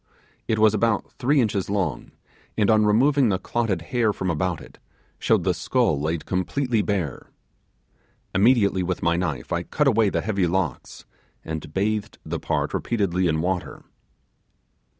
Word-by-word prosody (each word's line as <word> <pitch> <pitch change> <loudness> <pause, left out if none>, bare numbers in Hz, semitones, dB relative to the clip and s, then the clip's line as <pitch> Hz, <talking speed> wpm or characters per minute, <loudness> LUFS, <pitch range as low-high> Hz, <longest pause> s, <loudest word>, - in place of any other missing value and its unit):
It 110 - +1
was 110 -1 +5
about 110 0 0
three 140 +3 +1
inches 105 -6 0
long, 95 -7 -2 0.5
and 105 0 +3
on 110 -1 +4
removing 130 +4 +4
the 95 - +1
clotted 105 -5 -2
hair 115 -3 +3
from 95 -3 -2
about 85 +1 -1
it, - - -15 0.4
showed - - +2
the - - +2
skull 70 -2 0
laid 80 +1 -2
completely 115 +6 0
bare. 95 - -3 1.0
Immediately 100 -2 +3
with 90 0 -3
my 85 0 +2
knife 80 -8 -3
I 85 - 0
cut 150 - -1
away 110 -5 +4
the - - -1
heavy 100 -4 0
locks, 85 -6 -3 0.4
and 80 -2 -5
bathed 105 +4 -1
the - - -3
part - - -1
repeatedly 95 -5 0
in 80 -1 0
water. 90 +1 -3
100 Hz, 150 wpm, -24 LUFS, 85-110 Hz, 1.0 s, was